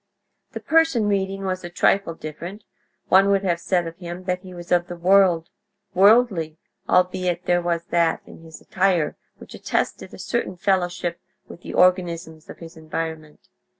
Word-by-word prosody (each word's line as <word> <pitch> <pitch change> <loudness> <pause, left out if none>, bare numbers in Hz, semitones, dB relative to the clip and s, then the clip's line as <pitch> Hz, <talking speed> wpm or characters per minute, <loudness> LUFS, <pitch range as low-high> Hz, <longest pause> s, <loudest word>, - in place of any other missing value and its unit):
The - - -5
person 320 -8 +2
reading 195 -1 -1
was 185 -1 -3
a 175 - -6
trifle 175 0 +1
different; 170 +7 -8 0.5
one 195 +1 +5
would 200 0 +2
have 175 -3 0
said 175 0 0
of 165 0 -8
him 175 0 -8
that 180 0 -2
he 185 -1 -12
was 175 -1 -10
of 175 0 +2
the 175 - -6
world, 180 -1 +3 0.4
worldly, 195 -6 +4 0.3
albeit 180 -1 +1
there 175 0 +2
was 170 -1 -1
that 170 -1 +1
in - - -14
his 160 -1 -12
attire 180 -5 0 0.2
which - - -13
attested - - -3
a - - -11
certain 185 - -3
fellowship 175 -2 -1 0.3
with 175 - -12
the - - -7
organisms 170 -3 +1
of - - -10
his 165 +1 -12
environment. 160 -1 -6
175 Hz, 165 wpm, -22 LUFS, 170-190 Hz, 0.5 s, one